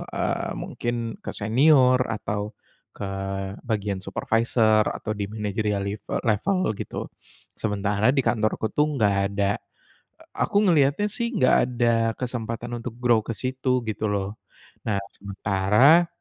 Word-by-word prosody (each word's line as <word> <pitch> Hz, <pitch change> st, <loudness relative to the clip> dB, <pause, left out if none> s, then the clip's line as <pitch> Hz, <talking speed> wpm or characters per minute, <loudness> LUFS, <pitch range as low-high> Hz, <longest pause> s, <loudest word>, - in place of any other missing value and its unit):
eee, -, -, -1 dB
mungkin 120 Hz, 0 st, -3 dB, 0.2 s
ke -, -, -6 dB
senior 130 Hz, +3 st, +4 dB
atau 105 Hz, -1 st, -3 dB, 0.4 s
ke -, -, -7 dB, 0.6 s
bagian 100 Hz, -3 st, -1 dB
supervisor 110 Hz, +2 st, +2 dB
atau 110 Hz, -, -4 dB
di 105 Hz, -1 st, -3 dB
manajerial 105 Hz, -1 st, -2 dB
live 100 Hz, +1 st, -5 dB, 0.2 s
level 120 Hz, -, +1 dB
gitu, -, -, -5 dB, 0.5 s
sementara 105 Hz, +3 st, +1 dB
di 135 Hz, -, +2 dB
kantorku 110 Hz, -1 st, 0 dB
tuh 150 Hz, 0 st, +1 dB
nggak 105 Hz, -6 st, +2 dB, 0.2 s
ada 100 Hz, 0 st, 0 dB, 0.8 s
aku -, -, -1 dB
ngelihatnya 150 Hz, +6 st, +3 dB
sih 235 Hz, +2 st, -3 dB
nggak 150 Hz, -11 st, +4 dB
ada 120 Hz, -2 st, +1 dB, 0.2 s
kesempatan 120 Hz, -1 st, -4 dB
untuk 115 Hz, 0 st, -6 dB
grow 120 Hz, -2 st, +4 dB
ke -, -, -3 dB
situ, 130 Hz, +1 st, -1 dB
gitu 110 Hz, 0 st, -2 dB
loh. 100 Hz, +1 st, -2 dB, 0.5 s
Nah, 105 Hz, -3 st, +1 dB, 0.2 s
sementara, 100 Hz, -, +3 dB
110 Hz, 125 wpm, -25 LUFS, 105-125 Hz, 0.8 s, senior